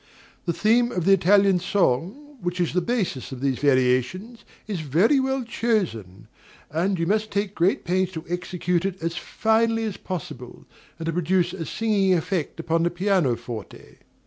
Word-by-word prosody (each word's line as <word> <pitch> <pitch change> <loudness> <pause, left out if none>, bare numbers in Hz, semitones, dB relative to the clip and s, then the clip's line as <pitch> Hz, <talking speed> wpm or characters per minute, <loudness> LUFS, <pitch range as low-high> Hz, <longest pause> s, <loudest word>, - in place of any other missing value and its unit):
The - - +3
theme 235 +6 +3
of 180 -7 -2
the 195 - +6
Italian 195 0 +4
song, 200 - -1
which 175 +1 -3
is 175 -3 0
the 180 - +2
basis 190 - -2
of 130 - -6
these 135 -1 -1
variations, 140 - +1 0.2
is 205 -5 -4
very 170 - +3
well 265 0 0
chosen, 165 - -2 0.4
and 180 +5 0
you 165 - 0
must 215 +4 0
take 200 -1 -2
great 180 +2 +1
pains 185 +1 +1
to 160 0 -6
execute 180 0 -1
it 190 -1 -3
as 165 0 -2
finely 225 +3 +1
as 215 -3 -3
possible, 135 -9 -7 0.3
and 165 - -6
to 165 - -1
produce 180 +1 +1
a 170 -4 -5
singing 200 -4 +2
effect 170 -1 -2
upon 165 0 0
the 170 - +2
piano 180 -7 +1
forte. 115 -4 -9
180 Hz, 170 wpm, -24 LUFS, 160-210 Hz, 0.4 s, the